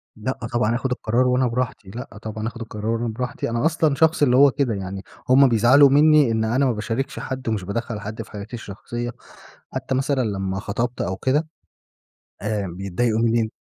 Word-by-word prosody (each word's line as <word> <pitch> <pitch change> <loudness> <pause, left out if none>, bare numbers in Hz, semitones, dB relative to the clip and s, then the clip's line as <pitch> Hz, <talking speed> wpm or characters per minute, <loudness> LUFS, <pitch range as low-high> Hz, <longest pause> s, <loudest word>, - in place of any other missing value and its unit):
لأ، 115 +5 -3 0.2
طبعًا 120 -1 +2
آخُد 125 +1 -2
القرار 125 +1 +1
وأنا 125 0 +2
براحتي، 120 -4 -3
لأ 115 0 -8
طبعًا 110 0 -4
آخد 115 0 -7
القرار 110 0 -3
أنا 120 - -2
براحتي. 125 +2 -3
أنا 115 +4 -1
أصلًا 160 -3 +2
شخص 160 +1 +3
اللي 125 -3 +4
هو 140 0 +7
كده 135 -4 0
يعني، 95 0 -5 0.3
همّ 135 +2 +7
بيزعلوا 120 +5 +6
منّي 150 -2 +5
إن 110 0 +1
أنا 125 +5 +2
ما 130 - +3
باشاركش 115 +4 -3
حد 130 -2 -4
ومش 105 -4 -1
بادخّل 105 +3 -3
حد 110 +2 -6
في 110 - -11
حياتي 105 +3 -8
الشخصية. 120 +3 -6 0.6
حتى 130 - -2
مثلًا 135 0 +1
لمّا 95 -3 -2
خطبْت 115 +5 -3
أو 95 +2 -2
كده، 145 +8 +1 1.0
آآ، 105 -1 -1
ف - - -6
بيتضايقوا 100 +5 -1
منّي 115 0 +2
ان 110 - 0
115 Hz, 195 wpm, -22 LUFS, 105-130 Hz, 1.0 s, هو